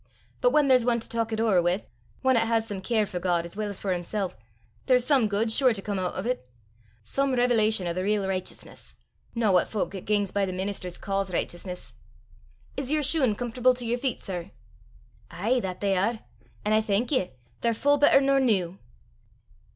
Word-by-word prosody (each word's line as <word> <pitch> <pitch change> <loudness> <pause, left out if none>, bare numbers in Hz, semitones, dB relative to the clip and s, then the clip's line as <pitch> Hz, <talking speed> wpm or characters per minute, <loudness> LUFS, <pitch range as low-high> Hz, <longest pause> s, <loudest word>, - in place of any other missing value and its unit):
But 245 - +5
whan 295 +2 +3
there's 255 -2 +5
ane 235 -1 +2
to 230 - -8
talk 230 -1 -2
it 220 - -2
ower 215 -6 +3
wi', 175 +4 0 0.4
ane 260 0 +5
'at 225 -1 +3
has 225 -1 +1
some 200 -3 -5
care 220 +1 +1
for 180 -3 -5
God 175 -1 0
as 170 - -9
weel 210 -1 -3
's 195 - -3
for 195 -2 -1
himsel', 180 +2 -3 0.5
there's 250 -2 +4
some 270 -7 +3
guid 215 +3 0
sure 255 +1 +4
to 195 - -4
come 205 -2 -2
oot 180 -1 -2
o' 185 - -3
't 250 +2 -1 0.6
some 275 - 0
revelation 220 -5 +2
o' 170 - -1
the 185 - -2
real 205 +1 0
richteousness 185 -1 -5 0.4
no 225 -3 +2
what 180 - +3
fowk 210 -2 -2
'at 190 - -7
gangs 205 -2 +1
by 200 - 0
the 185 -1 -2
ministers 185 -1 -3
ca's 195 -1 -2
richteousness. 180 +1 -4 0.8
Is 275 0 -3
yer 305 -1 +2
shune 270 -6 +2
comfortable 245 +2 +1
to 245 -1 -4
yer 235 +1 +1
feet, 260 0 -2
sir?" 180 -1 -5 0.8
"Ay, 220 +9 0
that 185 -5 -5
they 200 -1 +1
are! 220 +5 0 0.4
an' 210 - +2
I 215 - +4
thank 220 +4 0
ye: 190 - 0 0.3
they're 230 -1 0
full 285 +5 +2
better 290 -1 +6
nor 275 0 +3
new." 195 -8 +1
215 Hz, 205 wpm, -26 LUFS, 190-245 Hz, 0.8 s, better